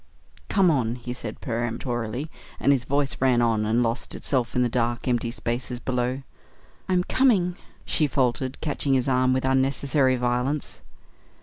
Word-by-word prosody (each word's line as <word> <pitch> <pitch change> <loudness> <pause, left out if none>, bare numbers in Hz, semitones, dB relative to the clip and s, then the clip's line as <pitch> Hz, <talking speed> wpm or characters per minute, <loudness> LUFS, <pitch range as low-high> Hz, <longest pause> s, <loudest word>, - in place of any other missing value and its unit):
"Come 190 -4 +4
on!" 120 -6 0
he 125 0 -6
said 125 - -7
peremptorily, 120 +2 -3 0.3
and 140 - +3
his 130 -3 +1
voice 140 -1 0
ran 130 -2 +4
on 115 -3 +2
and 115 +3 +2
lost 115 +1 -2
itself 125 -4 -1
in 125 - +3
the - - +2
dark, 120 0 -1
empty 120 -1 +1
spaces 120 +1 -3
below. 125 +1 -2 0.7
"I'm 180 -1 +3
coming," 190 -8 +2 0.3
she 155 - +1
faltered, 130 -1 0
catching 145 -2 0
his 130 0 +1
arm 130 -1 +3
with 130 0 +1
unnecessary 130 0 +2
violence. 125 +4 -1
130 Hz, 150 wpm, -25 LUFS, 120-135 Hz, 0.7 s, Come